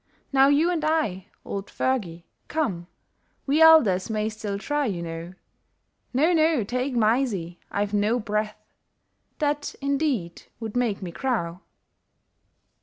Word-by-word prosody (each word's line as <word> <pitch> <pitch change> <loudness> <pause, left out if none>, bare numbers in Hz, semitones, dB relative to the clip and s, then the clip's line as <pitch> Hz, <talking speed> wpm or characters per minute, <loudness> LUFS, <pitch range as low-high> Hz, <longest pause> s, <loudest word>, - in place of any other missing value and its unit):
Now 270 0 +6
you 300 +5 +3
and 330 -3 -1
I, 265 - 0 0.2
old 200 0 -4
Fergie, 185 -11 -2 0.2
come, 195 - -2 0.6
We 290 +3 +2
elders 245 -14 +6
may 215 0 -1
still 215 -2 -4
try, 290 +6 -1
you 175 -5 -3
know, 165 +1 -6 0.8
No, 305 +8 +3
no! 315 -6 +3
take 250 +5 -2
Mysie, 215 -7 +1
I've 205 0 -2
no 210 +4 +2
breath, 210 -1 -2 0.8
That 295 -1 -1
indeed 275 - -1 0.2
would 225 -1 -6
make 235 -6 0
me 175 - -5
crow 180 -7 -2
225 Hz, 125 wpm, -25 LUFS, 195-285 Hz, 0.8 s, Now